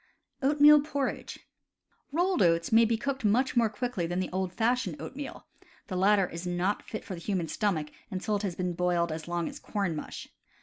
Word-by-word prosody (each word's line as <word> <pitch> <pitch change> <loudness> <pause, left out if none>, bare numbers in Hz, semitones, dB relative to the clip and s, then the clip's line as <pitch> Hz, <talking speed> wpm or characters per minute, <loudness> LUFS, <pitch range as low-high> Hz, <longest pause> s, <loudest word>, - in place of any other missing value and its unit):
Oatmeal 295 +2 +7
Porridge. 285 -2 -3 0.4
— - - -43
Rolled 350 - +1
oats 170 -2 +3
may 225 +1 +6
be 225 0 +1
cooked 270 +1 -3
much 245 +6 +2
more 230 -2 +4
quickly 210 -5 -2
than 175 +2 -2
the 185 - -2
old 185 0 -1
fashioned 245 +7 0
oatmeal; 280 +1 -7 0.4
the 185 - -3
lat 200 +3 +4
ter 195 - +3
is 170 +1 -6
not 180 +3 0
fit 220 - -7
for 195 - -6
the 170 - -7
human 185 -3 -1
stomach 160 -6 -1 0.2
until 190 +3 -2
it - - -5
has 195 -4 -3
been 180 0 -2
boiled 175 -1 +1
as 155 0 -5
long 175 -1 -1
as - - -7
corn 195 -6 -2
mush. 150 - -7
200 Hz, 205 wpm, -29 LUFS, 175-245 Hz, 0.4 s, Oatmeal